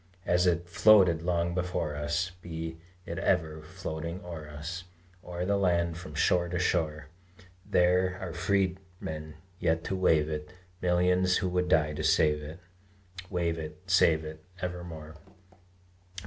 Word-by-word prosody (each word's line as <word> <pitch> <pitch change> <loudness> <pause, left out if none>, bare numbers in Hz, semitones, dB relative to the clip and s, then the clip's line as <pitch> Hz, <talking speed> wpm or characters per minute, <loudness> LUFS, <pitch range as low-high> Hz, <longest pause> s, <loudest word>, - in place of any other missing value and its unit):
As 90 +1 +3
it 85 0 +1
floated 90 -3 +5
long 85 0 0
before 90 -4 -2
us, 75 +4 -1
Be 80 -1 -5 0.3
it 85 - -4
ever 80 -4 +1
floating 85 0 -5
o'er 80 -3 -7
us, 80 +4 -6 0.4
O'er 90 0 -6
our - - 0
land 85 -3 +1
from 85 -3 -9
shore 85 +3 +2
to 90 - -2
shore: 75 -3 0 0.6
There 90 +1 +3
are 90 -3 -5
freemen 90 -4 -2 0.2
yet 80 -1 +1
to 95 - -2
wave 80 -5 +3
it, 75 +2 -5 0.3
Millions 90 +1 +3
who 95 - 0
would 90 0 0
die 75 -3 +3
to - - -4
save 75 -1 +3
it, 75 +3 -8 0.7
Wave 85 -3 -1
it, 75 -1 -6
save 85 -3 +4
it, 80 0 -8 0.2
evermore. 85 -3 -6
85 Hz, 140 wpm, -29 LUFS, 80-90 Hz, 0.7 s, floated